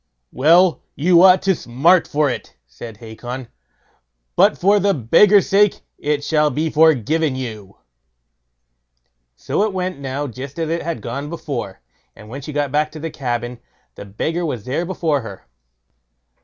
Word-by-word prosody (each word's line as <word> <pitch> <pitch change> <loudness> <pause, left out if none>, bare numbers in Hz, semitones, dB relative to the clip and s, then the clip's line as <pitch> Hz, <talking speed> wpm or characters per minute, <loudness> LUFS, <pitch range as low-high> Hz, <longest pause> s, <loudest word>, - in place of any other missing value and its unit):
"Well, 165 +3 +4
you 170 +3 +4
ought 185 0 +6
to 195 - +3
smart 160 +6 +2
for 150 0 +1
it", 125 - -5
said 100 - -11
Hacon; 120 +3 -8 0.9
"but - - +4
for 200 +3 +3
the 200 0 +1
beggar's 190 - +4
sake 205 0 +3 0.2
it 145 -1 -1
shall 150 0 +2
be 155 +3 -2
forgiven 155 -1 +2
you." 110 -6 -7 1.6
So - - -2
it 210 -1 0
went 185 -4 -3
now 140 +1 -4
just 135 +3 -8
as 165 -1 -2
it 170 +1 -1
had 165 -10 -5
gone 140 +5 -5
before, 135 - -6 0.3
and 105 -1 -14
when 135 +4 -7
she 150 - -7
got 145 -2 -2
back 150 +1 0
to 155 - -8
the 165 +1 -5
cabin, 120 -3 -4 0.3
the - - -10
beggar 160 - -3
was 125 -10 -4
there 155 +7 -2
before 160 -6 -1
her. 100 -5 -10
145 Hz, 155 wpm, -19 LUFS, 125-170 Hz, 1.6 s, ought